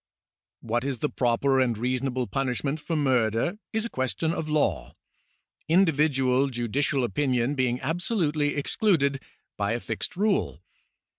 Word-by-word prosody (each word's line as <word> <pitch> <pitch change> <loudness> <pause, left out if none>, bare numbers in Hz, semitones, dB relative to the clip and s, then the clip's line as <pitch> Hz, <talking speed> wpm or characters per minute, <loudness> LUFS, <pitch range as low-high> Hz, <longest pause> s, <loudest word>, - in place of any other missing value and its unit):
What 120 +1 -1
is 135 -2 -2
the 150 - -1
proper 130 +2 +2
and 120 -4 +1
reasonable 125 +2 -1
punishment 135 +3 -2
for 165 +2 -3
murder 130 - +1
is 220 +1 0
a - - -4
question 130 +5 -1
of 155 -2 -4
law, 150 -1 0 0.7
individual 140 -6 +3
judicial 130 +3 0
opinion 130 0 0
being 125 -3 0
absolutely 160 -4 0
excluded 140 -3 +1 0.4
by 100 +2 0
a 120 - -1
fixed 115 +9 -4
rule. 205 0 0
135 Hz, 130 wpm, -26 LUFS, 125-155 Hz, 0.7 s, individual